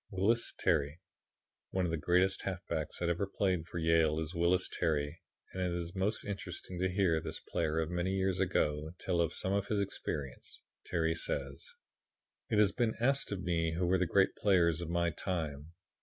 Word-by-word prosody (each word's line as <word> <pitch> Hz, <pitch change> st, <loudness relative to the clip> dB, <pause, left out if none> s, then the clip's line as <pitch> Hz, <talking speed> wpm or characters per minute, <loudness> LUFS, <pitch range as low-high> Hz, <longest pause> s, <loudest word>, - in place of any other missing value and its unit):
Wyllys 105 Hz, +5 st, +2 dB
Terry 80 Hz, -3 st, +1 dB, 0.7 s
One 95 Hz, -1 st, 0 dB
of 85 Hz, -, -1 dB
the -, -, +1 dB
greatest 90 Hz, +5 st, +2 dB
halfbacks 90 Hz, -5 st, -3 dB
that 85 Hz, -, 0 dB
ever 85 Hz, +3 st, 0 dB
played 90 Hz, -4 st, 0 dB
for 85 Hz, -, -6 dB
Yale 80 Hz, -1 st, +3 dB
is 80 Hz, +1 st, -3 dB
Wyllys 90 Hz, +2 st, +2 dB
Terry, 75 Hz, -2 st, -1 dB, 0.3 s
and 95 Hz, -, -3 dB
it 90 Hz, -1 st, 0 dB
is 85 Hz, 0 st, -3 dB
most 100 Hz, +3 st, 0 dB
interesting 90 Hz, -2 st, -5 dB
to 95 Hz, +1 st, +1 dB
hear 90 Hz, -4 st, +2 dB
this -, -, -5 dB
player 80 Hz, 0 st, -1 dB
of 80 Hz, +1 st, 0 dB
many 90 Hz, +1 st, 0 dB
years 95 Hz, -1 st, +1 dB
ago 80 Hz, -4 st, 0 dB
tell 85 Hz, -2 st, 0 dB
of 85 Hz, -1 st, +1 dB
some 95 Hz, +2 st, -1 dB
of 100 Hz, 0 st, 0 dB
his 105 Hz, -, 0 dB
experiences. 75 Hz, -9 st, -4 dB, 0.2 s
Terry 80 Hz, -2 st, +1 dB
says: 480 Hz, -, -3 dB, 0.7 s
"It 110 Hz, -, +1 dB
has 105 Hz, -2 st, +5 dB
been 115 Hz, 0 st, 0 dB
asked 135 Hz, +2 st, +2 dB
of 95 Hz, -2 st, -3 dB
me 85 Hz, -2 st, 0 dB
who 90 Hz, +1 st, 0 dB
were 90 Hz, +1 st, +3 dB
the 90 Hz, -, +1 dB
great 95 Hz, +3 st, +3 dB
players 85 Hz, -5 st, +3 dB
of 85 Hz, -, -4 dB
my 85 Hz, 0 st, +1 dB
time. 80 Hz, -3 st, -4 dB
90 Hz, 185 wpm, -33 LUFS, 80-95 Hz, 0.7 s, has